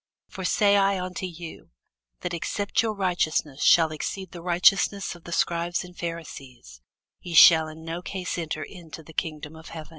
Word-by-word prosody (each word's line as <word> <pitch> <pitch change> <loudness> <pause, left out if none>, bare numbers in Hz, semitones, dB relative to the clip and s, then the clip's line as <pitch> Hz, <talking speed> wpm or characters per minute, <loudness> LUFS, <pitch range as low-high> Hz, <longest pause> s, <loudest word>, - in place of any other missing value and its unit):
For 195 - -8
I - - -4
say 205 +1 +3 0.2
unto 185 0 -4
you, 170 -2 -10 0.5
That 180 - -4
except 200 +6 -1
your 220 -2 -2
righteousness 165 -7 -1
shall 160 -2 +5
exceed 185 +4 -5
the 175 - -9
righteousness 185 +3 +2
of 175 -1 -16
the 170 - -8
scribes 170 +1 0
and 180 0 -13
Pharisees, 135 - -8 0.4
ye 175 -2 -6
shall 160 -1 +8
in 160 +1 -11
no 165 +2 -4
case 185 -1 -4
enter 155 -2 -4
into 165 -1 -11
the 160 - -14
kingdom 155 -2 -4
of 160 0 -12
heaven. 160 -2 -9
170 Hz, 175 wpm, -25 LUFS, 160-180 Hz, 0.5 s, shall